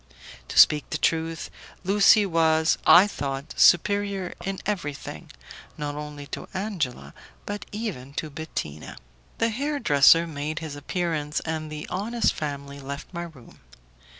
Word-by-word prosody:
To - - -6
speak 150 -2 +6
the - - -2
truth, 165 0 -1 0.3
Lucie 205 +2 +5
was, 160 -2 +2
I 180 +3 +9
thought, 140 -6 -5
superior 200 +1 +3
in 195 0 -3
everything, 150 - -4 0.5
not 145 -1 -3
only 150 -1 -7
to - - -5
Angela, 155 - -3 0.3
but 205 0 -5
even 190 - -5
to 155 0 -4
Bettina. 140 - -6 0.4
The 230 - +2
hair 285 +6 -2
dresser 155 - +5
made 155 -1 -5
his 160 -3 -5
appearance, 150 0 -2
and 155 -1 -4
the 150 0 -6
honest 225 +5 0
family 140 -2 -5
left 140 +5 -8
my 170 0 -4
room. 145 -8 -15
160 Hz, 135 wpm, -25 LUFS, 145-195 Hz, 0.5 s, I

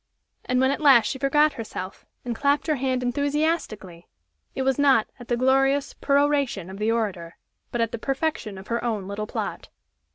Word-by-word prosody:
And 250 0 +1
when 260 +1 +3
at 285 - -3
last 265 -7 +6
she 265 - -3
forgot 295 +3 +3
herself, 195 -4 -7 0.2
and 240 -1 -3
clapped 280 +4 +1
her 310 -3 0
hand 260 -1 -1
enthusiastically, 280 - -2 0.5
it 265 - -1
was 265 +1 +1
not 270 -6 +4
at 245 - -11
the 240 - 0
glorious 270 +2 +2
peroration 280 - +1
of 195 - -9
the 215 +2 +1
orator 195 -7 -3 0.3
but 240 - -1
at 230 -1 0
the 235 - -5
perfection 270 -6 -2
of 190 - -11
her 235 0 -1
own 215 -5 -2
little 205 +1 -4
plot! - - -5
250 Hz, 185 wpm, -24 LUFS, 215-280 Hz, 0.5 s, last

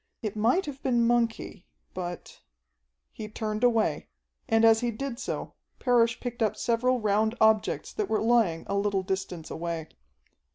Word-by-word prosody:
It 215 -2 -3
might 240 - +2
have 280 -2 -7
been 240 -2 +2
monkey, 230 -5 -1 0.3
but... 175 -1 -7 0.7
he 215 - -7
turned 215 +1 -4
away, 225 -11 +2 0.4
and 225 0 +4
as 225 0 +6
he 240 0 -1
did 235 +2 -5
so, - - -4 0.2
Parrish 235 -3 +2
picked 240 -2 -6
up 215 -1 +2
several 250 +2 +1
round 215 +1 +1
objects 220 -1 +2
that 420 -2 -2
were 220 - +1
lying 220 -8 +2
a - - -3
little 200 -1 0
distance 190 -3 -4
away. 165 -1 -4
220 Hz, 155 wpm, -27 LUFS, 200-240 Hz, 0.7 s, as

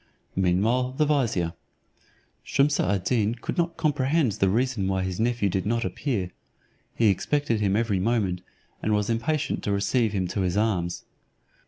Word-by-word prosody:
Meanwhile, 110 +8 +1
the 150 +3 +2
vizier. 115 - +1 0.9
Shumse 140 +1 +2
ad 95 0 +1
Deen 115 -1 +1
could 120 - -5
not 170 -1 -1
comprehend 150 -3 +1
the 95 0 +1
reason 115 -2 0
why 95 -1 0
his 95 0 -3
nephew 115 -2 +1
did 95 0 -1
not 115 +3 0
appear; 105 -11 -2 0.6
he 115 -2 +4
expected 120 +3 0
him 100 -1 +2
every 110 -3 +1
moment, 95 -4 0 0.4
and 105 0 +1
was 105 +2 0
impatient 145 +6 -1
to 105 - -1
receive 105 +3 +1
him 95 -3 -1
to 100 +2 -2
his 90 +1 0
arms. 90 -6 0
110 Hz, 160 wpm, -26 LUFS, 95-130 Hz, 0.9 s, he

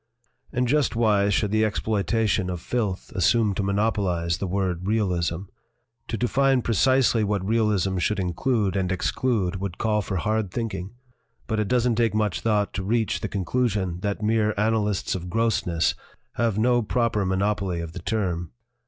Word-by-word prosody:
"And 125 0 0
just 145 -1 +2
why 105 -3 +3
should 100 0 +1
the 110 0 +3
exploitation 105 -1 0
of 90 -1 -3
filth 105 -1 -3
assume 105 +3 +2
to 100 - -2
monopolize 95 -4 0
the 95 - -2
word 95 -1 -2
'realism'? 90 -5 0 0.6
To 115 - -3
define 135 +1 +2
precisely 120 0 +3
what 100 -2 -1
realism 105 -4 +1
should 105 +3 0
include 95 +3 0
and 95 -2 0
exclude 95 0 0
would 95 -2 -5
call 110 -2 +1
for 95 -1 -3
hard 110 +2 0
thinking. 110 -1 -4 0.5
But 110 - -1
it 105 - 0
doesn't 120 -1 +2
take 115 -2 +2
much 105 -9 0
thought 105 +1 +1
to 100 - -3
reach 110 +2 0
the - - -4
conclu 120 +6 0
sion 95 -4 -2
that 100 +2 -3
mere 110 0 +2
annalists 105 -2 0
of 90 -1 -5
grossness 90 -6 +1 0.4
have 115 -3 0
no 120 +2 +3
proper 115 -2 0
monopoly 95 -1 0
of 85 -1 -6
the - - -6
term. 90 -6 -2
105 Hz, 160 wpm, -25 LUFS, 95-115 Hz, 0.6 s, why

